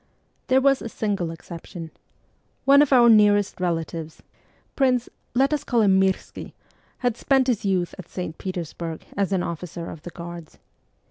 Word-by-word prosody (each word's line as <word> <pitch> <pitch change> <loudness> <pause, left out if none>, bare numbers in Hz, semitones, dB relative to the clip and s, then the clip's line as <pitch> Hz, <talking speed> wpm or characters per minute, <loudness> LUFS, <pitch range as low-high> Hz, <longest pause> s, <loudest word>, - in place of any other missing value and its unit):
There 260 0 +4
was 275 0 +3
a 230 - -5
single 200 -6 -2
exception. 165 0 -9 0.7
One 280 +1 +7
of 290 - +2
our 245 -3 +7
nearest 205 -3 +4
relatives, 165 -2 -3 0.5
Prince 255 -3 +2 0.3
let 270 +3 +3
me 300 - +1
call 240 -4 +1
him 190 -2 +4
Mirski 190 -1 -2 0.5
had 245 -3 +2
spent 265 +1 +2
his 240 -5 0
youth 185 -3 0
at 170 - -10
St. 180 -3 -5
Petersburg 170 -3 -5
as 200 -1 0
an 185 -2 +1
officer 170 0 -5
of 160 - -10
the 175 - -8
Guards. 170 -1 -9
190 Hz, 155 wpm, -24 LUFS, 170-245 Hz, 0.7 s, One